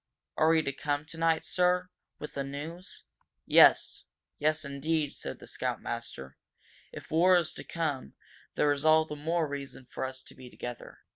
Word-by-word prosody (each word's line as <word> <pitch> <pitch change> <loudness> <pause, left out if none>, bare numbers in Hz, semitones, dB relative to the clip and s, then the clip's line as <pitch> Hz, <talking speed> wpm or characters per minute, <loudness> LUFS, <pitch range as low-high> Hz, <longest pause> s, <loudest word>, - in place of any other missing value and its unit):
"Are 155 - +4
we 160 -1 +4
to 140 - -2
come 145 +2 -2
tonight, 165 0 0
sir?" 180 0 +2
he - - -24
said. 180 - -40
"With 150 - -6
this 140 -1 -3
news 155 +6 -7 0.2
?" - - -54
"Yes - - +6 0.3
yes, 155 +1 +1
indeed," 145 +2 -1
said - - -6
the - - -12
scoutmaster. 65 0 -4 0.5
"If - - -10
war 175 +4 +5
is 170 -3 -1
to - - -8
come, 145 - -3 0.4
there 145 - +3
is 145 0 -1
all 160 0 +5
the 150 - -6
more 160 +2 0
reason 140 -2 -7
for 125 - -6
us 130 0 -4
to - - -13
be 130 -1 -12
together. 120 -1 -8
150 Hz, 185 wpm, -30 LUFS, 140-165 Hz, 0.5 s, Yes